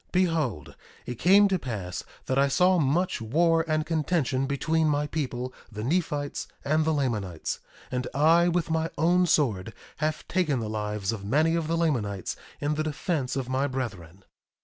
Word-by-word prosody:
Behold, 160 - 0 0.3
it 125 -2 -6
came 200 +3 +6
to 190 -2 0
pass 100 - -5 0.2
that 130 +1 +1
I 140 - +4
saw 180 +6 +3
much 160 +2 +1
war 165 +8 +3
and 155 -1 +1
contention 155 -5 0
between 160 +3 +1
my 145 0 +1
people, 130 -4 -3 0.2
the 105 0 -5
Nephites, 145 0 -1 0.2
and 155 +2 +2
the 160 - +2
Lamanites; 110 - -2 0.3
and 125 -1 -2
I, 165 +4 +4
with 175 -1 0
my 160 0 0
own 175 +3 +3
sword, 115 - +1 0.2
have 155 0 -2
taken 165 -8 +1
the 110 -2 -4
lives 105 -2 -2
of 110 -4 -5
many 150 +10 +2
of 165 -2 0
the 165 +1 0
Lamanites 110 - -1 0.2
in 145 +1 0
the 155 +1 -1
defence 150 -3 -2
of 135 -3 -2
my 130 +2 0
brethren. 100 -9 -5
145 Hz, 170 wpm, -27 LUFS, 120-165 Hz, 0.3 s, came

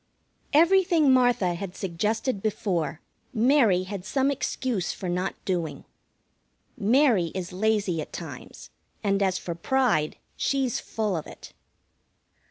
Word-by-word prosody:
Everything 335 -3 +5
Martha 245 -8 +3
had 180 +1 -6
suggested 210 +5 -1
before, 180 -7 -2 0.3
Mary 225 -6 +4
had 190 -1 -6
some 270 +7 +1
excuse 255 - -2
for 185 - -6
not 180 +2 -1
doing. 165 -7 -2 0.9
Mary 230 - +3
is 180 -1 -4
lazy 200 -4 +1
at - - -8
times, - - -9 0.3
and, 200 -1 +1
as 190 -2 +2
for 170 - -4
pride, 170 -5 +1 0.2
she's 270 -4 0
full 215 -4 -2
of 160 - -4
it. - - -12
205 Hz, 120 wpm, -26 LUFS, 180-255 Hz, 0.9 s, Everything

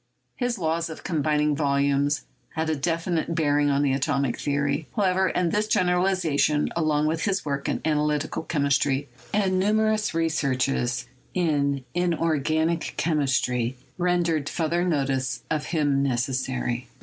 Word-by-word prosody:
His 245 -1 -1
law 165 -2 0
of 160 - -9
combining 150 -3 +1
volumes 140 0 +1 0.3
had 160 0 0
a - - +1
definite 165 +2 -1
bearing 145 -3 +2
on 140 0 +2
the 135 -2 +2
atomic 140 -2 0
theory, 140 +1 -1
however, 190 -3 +2
and 180 -2 0
this 210 +1 +1
generalization, 180 -6 +2
along 155 -2 +1
with 160 +1 0
his 195 -3 0
work 140 -1 -2
in - - -1
analytical 150 -1 0
chemistry 140 -3 0 0.2
and 190 -2 +1
numerous 215 0 +1
researches 135 -6 0 0.3
in 140 -6 +1
inorganic 165 -1 0
chemistry, 130 -5 0 0.2
render 175 -3 +1
further 170 +1 0
notice 135 -6 -1
of 155 -1 0
him 145 -4 +1
necessary. 125 -1 -1
150 Hz, 125 wpm, -25 LUFS, 140-170 Hz, 0.3 s, bearing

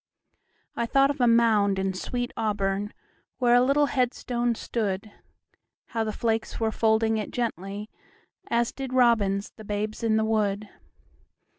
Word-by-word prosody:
I 235 - -1
thought 275 +2 +4
of 285 -2 -5
a 245 - +5
mound 220 -4 +4
in 190 0 -1
sweet 245 +6 -4
AuburnWhere 205 -2 -1 0.7
a 245 - +6
little 280 +3 +3
headstone 245 -3 0
stood; 210 -3 -3 0.8
How 225 -1 -1
the 215 - -2
flakes 225 0 -2
were 225 -1 +1
folding 220 0 +2
it 210 - -4
gently, 205 -3 -4 0.6
As 235 0 +1
did 265 -2 -6
robins 215 -6 +2
the 220 - -13
babes 210 +1 -3
in 220 -1 +2
the 220 - +1
wood. 210 -1 0
220 Hz, 140 wpm, -26 LUFS, 205-240 Hz, 0.8 s, a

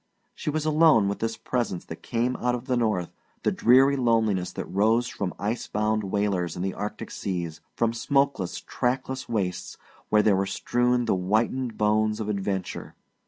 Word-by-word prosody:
She - - -4
was 155 0 -1
alone 155 -9 +5
with 100 - -2
this 115 0 -2
presence 120 -8 -2
that - - -9
came 120 +2 -1
out 125 0 0
of 120 0 -7
the 130 -2 0
North, 110 -7 0 0.3
the - - +2
dreary 135 +3 +5
loneliness 110 -7 +1
that - - -4
rose 110 +5 +2
from 95 -6 -3
ice 105 +5 -2
bound 105 0 0
whalers 95 -4 -1
in 90 - -4
the 95 -1 -1
Arctic 105 +1 -5
seas, 85 -4 -4
from 115 -1 +1
smokeless, 135 -6 0
trackless 130 +1 -2
wastes 95 -5 -2 0.3
where 105 0 +4
were 95 +1 0
strewn 120 +4 +1
the 110 - +2
whitened 110 +6 0
bones 105 0 +2
of 105 -1 -3
adventure. 95 -2 -3
110 Hz, 165 wpm, -26 LUFS, 100-125 Hz, 0.3 s, alone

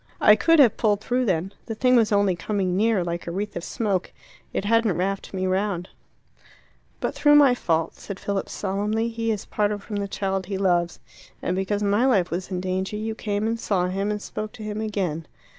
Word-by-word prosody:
I 210 - +7
could 330 +8 +4
have 260 -8 +6
pulled 210 -3 +2
through 250 +4 0
then 185 -1 -1
the 225 - -4
thing 255 +3 +3
was 225 -3 +4
only 200 -3 +3
coming 185 0 -1
near, 210 -1 +2
like 170 0 -4
a - - -2
wreath 200 +3 -4
of 175 - -4
smoke; 200 -4 -2 0.4
it - - -2
hadn't 230 -2 +2
wrapped 195 +2 -2
me 185 -1 -2
round." 185 -1 -1 1.1
"But - - -2
through 295 0 +4
my 285 -4 +7
fault," 165 -8 0
said 200 -2 -8
Philip 200 -1 -2
solemnly, 210 +3 -1
"he 230 0 -3
is 210 -3 -2
parted 205 -1 -1
from 210 - -5
the 200 0 -2
child 195 -2 -2
he 195 -1 -3
loves. 175 -3 +1 0.4
And 180 - -2
because 200 +2 -1
my 205 +5 +3
life 195 -9 +2
was 180 +2 -3
in 185 -2 -2
danger 185 +2 -2
you 220 +1 -3
came 210 -1 -2
and 230 +1 -1
saw 180 -5 0
him 195 +2 -1
and 210 0 -1
spoke 215 0 -5
to 220 - -9
him 215 0 -4
again." 185 -7 -2
200 Hz, 210 wpm, -24 LUFS, 185-220 Hz, 1.1 s, I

